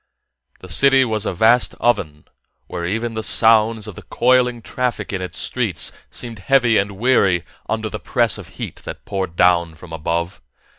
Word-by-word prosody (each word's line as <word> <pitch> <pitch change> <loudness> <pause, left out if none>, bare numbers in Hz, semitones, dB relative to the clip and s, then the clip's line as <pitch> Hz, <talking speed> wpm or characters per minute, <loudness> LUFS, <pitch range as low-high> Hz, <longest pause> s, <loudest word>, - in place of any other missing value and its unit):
The 95 - -11
city 135 +8 +4
was 110 -2 -2
a - - 0
vast 115 +6 +2
oven 85 -11 -1 0.4
where 85 -1 -5
even 115 +5 -2
the 110 0 -4
sounds 110 0 +4
of 105 - -8
the - - -11
coiling 125 -1 +1
traffic 120 -6 -3
in 95 - -3
its 90 -2 -5
streets - - 0 0.2
seemed 115 -3 -7
heavy 120 +2 +3
and 100 +1 -2
weary 100 -7 +2 0.3
under 110 0 -2
the 105 0 -6
press 120 -2 0
of - - -10
heat - - -6
that - - -10
poured 95 -4 -4
down 85 -2 +2
from 80 +1 -13
above. 85 +3 -3
110 Hz, 175 wpm, -19 LUFS, 90-120 Hz, 0.4 s, city